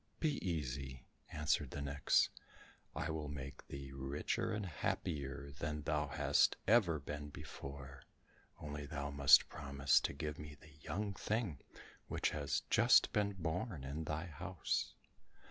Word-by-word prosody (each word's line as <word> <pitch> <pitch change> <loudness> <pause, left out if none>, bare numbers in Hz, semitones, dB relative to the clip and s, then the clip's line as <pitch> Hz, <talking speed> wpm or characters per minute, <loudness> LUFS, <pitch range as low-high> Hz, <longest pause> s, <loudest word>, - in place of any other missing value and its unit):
"Be 150 -3 0
easy," 65 -6 -3 0.3
answered 75 -2 +1
the - - -5
nix, 70 0 +3 0.6
"I 80 - -1
will 80 -1 -3
make 70 -1 -7
thee 70 0 -7
richer 70 +2 -1
and 105 -1 -2
happier 70 -4 -3
than 75 -2 -2
thou 75 -1 0
hast 75 - +3
ever 100 -8 +5
been 75 +1 -5
before, 70 -1 -8 0.6
only 75 -1 -5
thou 70 -2 -3
must 70 -1 +7
promise 70 -1 +2
to - - -2
give 75 +1 -4
me 75 -1 -8
the 75 -2 -16
young 100 +4 -2
thing 100 - -1 0.5
which - - 0
has 70 -3 -1
just - - +6
been 100 -1 +2
born 90 - -3
in 75 +4 -4
thy 75 +2 -2
house." 90 +2 -2
75 Hz, 140 wpm, -37 LUFS, 70-85 Hz, 0.6 s, must